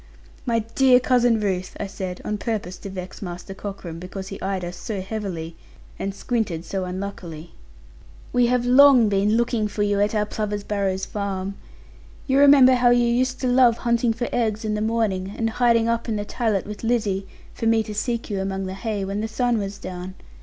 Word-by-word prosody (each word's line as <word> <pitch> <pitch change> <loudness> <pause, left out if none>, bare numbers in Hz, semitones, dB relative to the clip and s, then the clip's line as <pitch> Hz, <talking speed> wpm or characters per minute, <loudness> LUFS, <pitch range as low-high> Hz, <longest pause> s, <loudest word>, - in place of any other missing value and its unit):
'My 230 -2 +1
dear 260 -1 +6
Cousin 245 -3 +3
Ruth,' 185 -3 -2
I - - -2
said, 185 -2 -6
on 210 -1 -2
purpose 205 -6 -3
to 200 - -7
vex 185 -1 -8
Master 180 0 -6
Cockram, 195 -4 -7
because 190 +2 -7
he 195 - -8
eyed 190 -2 -2
us 175 +1 -6
so 205 +2 -5
heavily, 185 -5 -5 0.4
and 195 0 -3
squinted 210 -11 -2
to 190 +1 -3
unluckily, 180 -3 -6 0.8
'we 245 -1 +4
have 245 0 +1
long 255 -3 +7
been 205 +2 +2
looking 235 -2 +1
for 205 0 -2
you 205 -1 +1
at 205 +2 +1
our 210 0 +2
Plover's 210 -1 -3
Barrows 195 -2 -1
farm. 195 -1 -3 0.7
You 270 +1 +2
remember 280 -2 +8
how 245 -1 +4
you 240 0 +4
used 255 +2 +1
to 255 - 0
love 245 -2 +5
hunting 235 -1 +1
for 240 +2 -2
eggs 220 -2 0
in 215 - -1
the 210 - -1
morning, 210 -4 -1
and 225 0 0
hiding 230 -1 +3
up 230 0 -1
in 220 - 0
the 205 0 -3
tallat 215 -4 -1
with 210 +1 -8
Lizzie, 210 -5 0 0.3
for 225 - -2
me 225 -1 +3
to 215 -1 -7
seek 230 +2 -2
you 200 -3 -2
among 195 0 -3
the 185 - -4
hay, 205 -1 -3
when 200 +2 -3
the 220 - -2
sun 235 +1 0
was 200 0 -4
down. 185 +1 -7
210 Hz, 200 wpm, -23 LUFS, 195-235 Hz, 0.8 s, remember